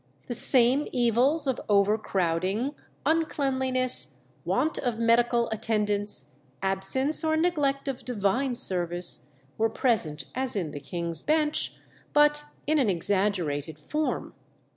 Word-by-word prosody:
The 245 - -5
same 255 +4 +4
evils 255 +6 +2
of 265 -3 -1
overcrowding, 200 - 0 0.3
uncleanliness, 265 -5 +1 0.2
want 315 - 0
of 245 -4 -2
medical 235 +1 +2
attendance, 210 -6 -1 0.3
absence 195 - +4
or 315 0 +1
neglect 290 -5 0
of 270 -2 -4
divine 245 +3 -1
service, 175 -6 0 0.3
were 225 +1 +2
present 220 - +1
as 260 -1 -1
in 175 -7 -3
the 145 - -7
King's 170 +2 -4
Bench, 305 -1 0 0.4
but 295 0 +3 0.2
in 310 +1 +1
an 250 -6 +2
exaggerated 175 -5 -1
form. 300 - -3
235 Hz, 115 wpm, -26 LUFS, 195-275 Hz, 0.4 s, same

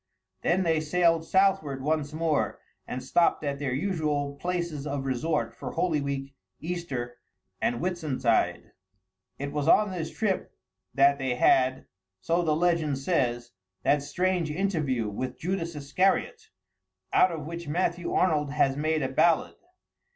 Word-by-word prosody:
Then 180 +3 +2
they 165 -2 +2
sailed 165 +1 +2
southward 155 -9 +2
once 150 0 0
more, 155 -1 0 0.3
and 125 +1 -5
stopped 165 +5 +2
at 140 -1 -2
their 140 -3 -2
usual 150 -2 -1
places 170 -4 -3
of 140 -1 -3
resort 135 +4 -1
for - - -7
Holy 165 -3 +1
Week, 140 -1 -4 0.3
Easter, 135 -8 -4 0.4
and 120 - +1
Whitsuntide. 155 -10 0 0.7
It 140 +1 -4
was 145 0 -2
on 210 +4 +5
this 165 -4 -4
trip 205 -4 -2 0.4
that 140 +1 +5
they 130 -2 -1
had, 130 +1 +3 0.3
so 170 - +1
the 155 -3 +1
legend 165 -4 +1
says, 125 -5 -1 0.3
that 145 0 +3
strange 175 +3 0
interview 150 - -1
with 125 +5 -4
Judas 170 -2 -3
Iscariot, 150 +7 0 0.6
out 185 - +5
of 160 -3 -5
which 170 +1 -6
Matthew 175 +2 -1
Arnold 150 -5 +2
has 135 -2 +2
made 155 +1 0
a - - +1
ballad. 160 +4 +2
155 Hz, 140 wpm, -27 LUFS, 140-170 Hz, 0.7 s, on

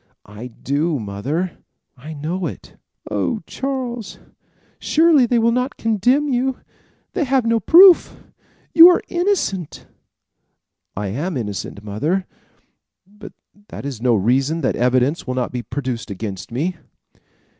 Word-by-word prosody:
"I 105 +4 -9
do 145 +6 -2
mother. 130 - -4 0.4
I 150 +5 -10
know 165 +5 -3
it." - - -10 0.4
"Oh, 95 -4 -1
Charles, 250 -5 -5 0.6
surely 310 -5 +4
they 240 - +1
will 230 0 +3
not 250 +3 -2
condemn 240 +7 +1
you! 260 -1 0 0.6
They 355 - 0
have 265 -3 +1
no 230 0 +2
proof. 350 - +6 0.5
You 335 +2 +10
are 355 - +2
innocent." 350 - -2 1.1
"I 105 -1 -3
am 145 - -3
innocent, 105 -2 -5
mother; 150 - -2 0.8
but 205 +2 -13 0.3
that - - -9
is 130 -6 -6
no 125 -2 +3
reason 130 - +1
that 130 - 0
evidence 130 +6 +1
will 130 - -2
not 125 -1 -2
be 125 - -4
produced 120 -2 -5
against 100 0 -6
me." 165 +9 -2
160 Hz, 130 wpm, -20 LUFS, -, 1.1 s, You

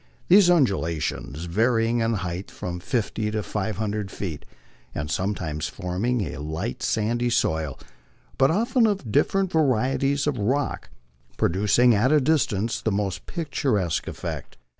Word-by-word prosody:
These 190 0 +7
undulations, 85 - 0
varying 115 +5 +2
in 115 0 +1
height 90 0 -4
from 90 0 -5
fifty 110 +1 -1
to 105 0 -2
five 105 -1 -3
hundred 105 -2 -2
feet, 90 -6 -6 0.5
are 75 0 -3
sometimes 80 -3 -2
formed 100 +7 -1
of - - -3
a - - -7
light 80 +10 -4
sandy 120 +2 0
soil, 80 - 0 0.6
but 135 0 +4
often 230 - +3
of 195 - -2
dif 145 - +4
ferent 195 -1 0
varieties 135 -1 +1
of 145 -4 -1
rock, 135 +7 -1 0.5
producing 105 +7 +3
at 115 +6 +3
a 155 - +6
distance 125 -7 +1
the 110 - 0
most 100 -2 -2
picturesque 135 - -1
effect. - - -6
110 Hz, 140 wpm, -24 LUFS, 90-135 Hz, 0.6 s, These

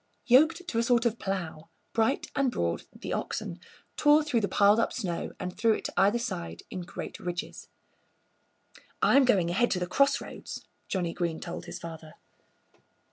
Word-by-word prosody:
Yoked 315 +8 +4
to 230 -8 0
a - - +4
sort 235 0 +2
of 235 0 +1
plough, 170 -4 -4 0.2
Bright 225 +5 +1
and 275 -2 +2
Broad, 85 - -2
the - - -6
oxen, 170 - -3 0.4
tore 300 +1 +5
through 270 -7 +1
the 200 - +1
piled 205 +2 +4
up 230 - +1
snow 180 -9 -3
and 180 0 -5
threw 225 -1 +3
it - - -4
to - - -3
either 205 +4 +4
side 85 - -5
in 185 - -4
great 175 - -7
ridges. 175 -1 -5 1.4
"I'm 275 -1 +6
going 185 -8 +3
ahead 240 +7 +2
to 180 - 0
the 180 - -1
crossroads," 275 +10 0 0.2
Johnnie 175 -3 -1
Green 170 -3 -2
told - - -6
his - - -6
father. 160 -2 -9
200 Hz, 170 wpm, -28 LUFS, 175-245 Hz, 1.4 s, I'm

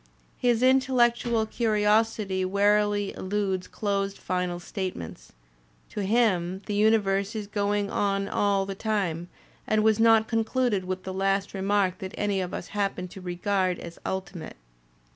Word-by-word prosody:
His 245 -1 +2
intellectual 245 -3 +3
curi 215 -1 0
osity 210 -3 +2
warily 205 +1 +2
eludes 190 -1 -2
closed 200 -1 -2
final 180 -1 -2
statements; 175 - -6 0.6
to 210 - -3
him 190 -4 +1
the 210 - -3
uni 215 +2 +5
verse 200 +1 -1
is 215 -1 -3
going 205 0 -1
on 195 -1 0
all 200 -1 +1
the 195 - -4
time 190 -5 -2 0.4
and 215 0 +2
was 220 0 +3
not 225 -1 +5
concluded 225 -3 0
with 185 0 -4
the 190 - -5
last 195 +1 0
remark 195 -1 +1
that 190 -2 -7
any 200 -2 0
of 180 - -4
us - - -6
happened 195 -3 -2
to 190 - -10
regard 185 +1 0
as 170 0 -10
ul 190 0 -2
timate. 170 -4 -9
200 Hz, 150 wpm, -26 LUFS, 190-215 Hz, 0.6 s, uni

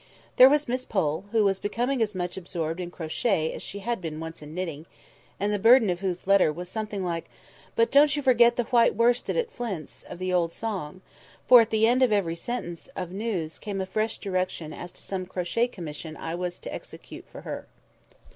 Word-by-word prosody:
There 255 +1 +10
was 295 +1 +2
Miss 250 +1 -1
Pole, 170 -4 -1
who 225 -2 +3
was 195 -1 +2
becoming 240 +6 -1
as 210 -2 0
much 180 -1 -3
absorbed 170 -2 -3
in 175 -1 -4
crochet 160 0 -1
as - - -7
she 200 - -6
had 235 -4 -1
been 155 -2 -5
once 165 0 -7
in 150 +1 -10
knitting, 165 -4 -4 0.5
and 205 +1 0
the 205 - 0
burden 230 -1 +6
of 175 - -3
whose 185 -2 -3
letter 195 -5 +5
was 175 +3 -7
something 210 -2 -3
like, 170 -1 -2 0.5
"But 460 -1 +3
don't 290 +1 +6
you 290 - -2
forget 240 -2 +5
the 240 - +1
white 235 0 +3
worsted 240 - +2
at 480 -1 -1
Flint's" 175 - -5
of - - -10
the 185 0 -2
old 170 -2 +2
song; 185 -5 -5 0.5
for 245 -2 +10
at 225 - 0
the 220 0 +3
end 245 +3 +3
of 255 -3 +4
every 190 -6 +1
sentence 175 -3 -5
of 180 -2 -4
news 190 -6 -3
came 205 -2 -4
a 190 - -1
fresh 215 +3 -1
direction 185 -5 -3
as 175 - -7
to - - -8
some 185 -2 -4
crochet 185 +6 0
commission 160 -6 -7
which - - -11
I 165 - -3
was 180 0 -3
to - - -8
execute - - -10
for - - -11
her. - - -6
190 Hz, 215 wpm, -26 LUFS, 175-230 Hz, 0.5 s, There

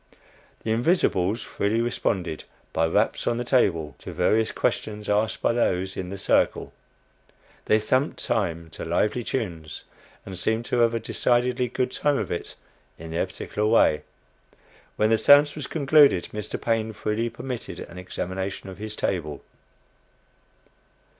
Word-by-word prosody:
The 110 - -1
"invisibles" 110 - +2
freely 105 +3 -1
responded, 95 -8 -1 0.3
by 80 0 +2
raps 105 +7 +1
on 120 - +1
the 120 - -1
table, 85 - +2
to - - -8
various 110 0 +2
questions 105 -1 -2
asked 105 +1 0
by - - +3
those 95 -5 0
in 90 -1 -4
the 100 - -5
"circle." 95 - +1 0.9
They 110 - +4
thumped 130 +7 0
time 85 -6 -1
to - - -7
lively 105 +8 0
tunes, 85 -12 -4 0.4
and 95 -2 -7
seemed 110 +4 0
to 125 - 0
have 115 0 +3
a - - 0
decidedly 125 +2 +1
good 125 +1 -1
time 145 -1 +1
of - - -3
it 85 - -4 0.4
in 80 0 -9
their 85 - 0
particular 105 0 -3
way. 95 -9 +4 0.9
When 110 +1 +2
the 115 - +5
séance 145 +4 +6
was 150 -3 -5
concluded, 145 - +4
Mr. 105 0 -4
Paine 110 -1 0
freely 110 +3 -1
permitted 125 -1 -6
an 90 - -9
examination 95 +2 -4
of 95 - -10
his 110 0 -5
table. 75 -9 -2
110 Hz, 145 wpm, -25 LUFS, 95-120 Hz, 0.9 s, séance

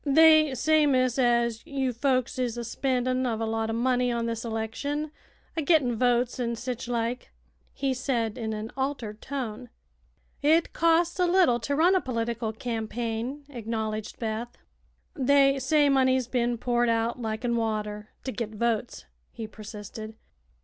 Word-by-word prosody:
"They 310 -1 +6
say, 310 +3 +3
miss, 255 -2 +2
as 235 -2 +2
you 270 -5 -2
folks 255 0 0
is 245 -2 -1
a 240 - -3
spendin' 255 +1 0
uv 235 -4 -1
a 225 - -1
lot 225 0 -1
o' - - -1
money 250 +1 +1
on 235 -1 -1
this 230 -1 -3
election, 240 +7 -3 0.4
a 325 - 0
gittin' 285 -6 +3
votes, 245 +1 +1
an' 235 -1 -1
sich 245 +1 -5
like," 240 0 -2 0.4
he 275 -1 -1
said, 240 -4 -1
in 225 -3 -3
an 215 +1 -5
altered 260 -6 -3
tone. 250 -4 -5 0.7
"It 320 +3 +3
costs 335 +2 +2
a 360 - +4
little 345 -10 +4
to 285 +5 -2
run 340 +5 +4
a 375 - +3
political 230 -2 -2
campaign," 230 +3 -3
acknowledged 220 -3 -4
Beth. 225 +1 -4 0.6
"They 275 0 +4
say 290 +3 +3
money's 260 -2 +3
bein' 240 -1 0
poured 240 0 +1
out 230 +2 0
liken 230 +2 -1
water 210 -2 -2
to 260 - -3
git 225 -3 -5
votes," 235 +1 -1 0.3
he 230 -2 -6
persisted. 215 0 -9
245 Hz, 155 wpm, -27 LUFS, 225-270 Hz, 0.7 s, They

